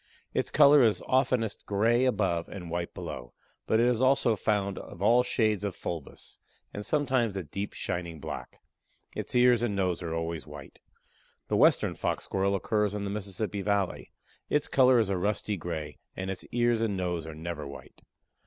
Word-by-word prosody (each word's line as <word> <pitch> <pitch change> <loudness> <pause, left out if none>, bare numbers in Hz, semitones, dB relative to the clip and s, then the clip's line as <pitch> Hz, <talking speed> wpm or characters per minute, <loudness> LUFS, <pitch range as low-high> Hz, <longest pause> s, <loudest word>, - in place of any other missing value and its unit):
Its - - 0
color 145 0 +7
is 110 -4 +3
oftenest 125 -5 +1
gray 115 +5 +3
above 95 -9 0
and 90 -4 -8
white 85 0 -2
below, 60 -1 -7 0.3
but 110 - +3
it 120 - +4
is 125 -1 +2
also 130 -3 +3
found 100 -1 -1
of - - -11
all 115 +5 +5
shades 110 -5 +1
of 100 -3 -2
fulvous, 80 -5 -7 0.3
and 105 - -5
sometimes 130 -5 +1
a 95 - -3
deep 100 +6 -5
shining 85 -3 -4
black; - - -7 0.5
its - - -4
ears 125 -1 +5
and 115 -4 0
nose 95 -3 0
are 80 -2 -3
always 80 -2 -4
white. 75 -2 -11 0.7
The - - +1
Western - - +4
Fox - - -2
Squirrel 100 +1 0
occurs 105 +1 0
in 105 - -3
the 100 - -3
Mississippi 100 0 -3
valley; 100 -2 -1 0.4
its 150 - +1
color 130 -1 +5
is 110 -4 +2
a 95 - 0
rusty 105 +2 -1
grey, 80 -4 -5 0.2
and 95 0 -3
its 95 - -6
ears 120 -1 +1
and 105 -4 0
nose 90 -3 -2
are 80 - -7
never 80 -2 -5
white. 70 - -12
100 Hz, 180 wpm, -29 LUFS, 85-115 Hz, 0.7 s, color